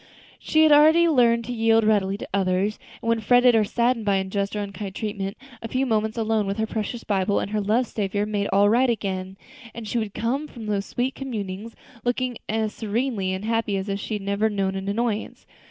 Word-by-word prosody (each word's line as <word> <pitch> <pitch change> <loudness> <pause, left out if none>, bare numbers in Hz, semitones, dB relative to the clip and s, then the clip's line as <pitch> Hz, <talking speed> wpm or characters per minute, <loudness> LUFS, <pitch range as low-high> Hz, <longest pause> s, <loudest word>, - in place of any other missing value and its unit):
She 315 0 +3
had 310 - +5 0.4
learned 235 -4 +3
to 245 - -4
yield 225 -1 +3
readily 200 -2 +2
to - - -7
others, 195 +2 0 0.2
and 230 - -1
when 230 0 +2
fretted 245 +3 +5
or 220 -1 +4
saddened 235 +2 0
by 200 -1 +2
unjust 195 +1 -2
or - - -1
unkind 200 -1 -6
treatment, 200 -2 -4 0.2
a 225 - -5
few 260 +4 0
moments 220 -2 0
alone 220 -2 0
with 195 +1 -2
her 220 - 0
precious 220 +2 -4
Bible 200 -1 +1
and 200 - -4
her 215 -1 0
loved 225 +5 +1
Saviour 205 -1 -1
made 205 -1 -1
all 200 +1 +4
right 245 +4 +3
again, 190 -4 -3 0.4
and 230 -2 -7
she 235 - -1
would 210 -3 -4
come 265 +7 -1
from 235 -6 -10
those 205 -1 -2
sweet 255 +2 -1
communings 220 -4 -6 0.3
looking 245 0 -1
as 220 0 -1
serenely 220 -3 -1
happy 225 -2 0
as 190 +1 -4
if 200 0 -2
she 215 - -4
had 205 - -5
never 200 +2 +1
known 195 -2 -1
an 195 0 -5
annoyance. 220 0 -2
215 Hz, 205 wpm, -24 LUFS, 200-230 Hz, 0.4 s, had